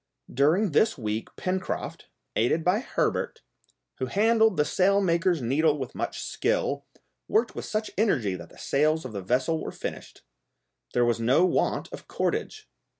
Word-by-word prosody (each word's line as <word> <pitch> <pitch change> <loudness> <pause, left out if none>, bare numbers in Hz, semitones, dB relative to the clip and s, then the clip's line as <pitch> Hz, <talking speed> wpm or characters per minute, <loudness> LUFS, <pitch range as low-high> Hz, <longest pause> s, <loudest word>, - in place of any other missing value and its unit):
During 160 - +3
this 215 +8 +3
week 110 -2 -3
Pencroft, 185 0 -3 0.3
aided 125 +8 +2
by 180 +5 +3
Herbert, 250 - -1 0.6
who 130 - -1
handled 220 - +3
the 150 - +3
sail 195 +4 +3
maker's 170 -4 +1
needle 150 +5 +2
with 130 -4 -5
much - - -4
skill, - - -1 0.4
worked 225 +2 +1
with - - -6
such 215 0 -2
energy 135 - +2
that 85 -2 -8
the - - -18
sails 155 +2 +1
of 125 - -6
that 100 - -4
vessel 130 - 0
were - - -4
finished. - - -7 0.7
There 120 0 +4
was 120 -1 +1
no 130 +10 +4
want 185 - 0
of - - -9
cordage. 430 -1 -2
160 Hz, 155 wpm, -27 LUFS, 125-200 Hz, 0.7 s, There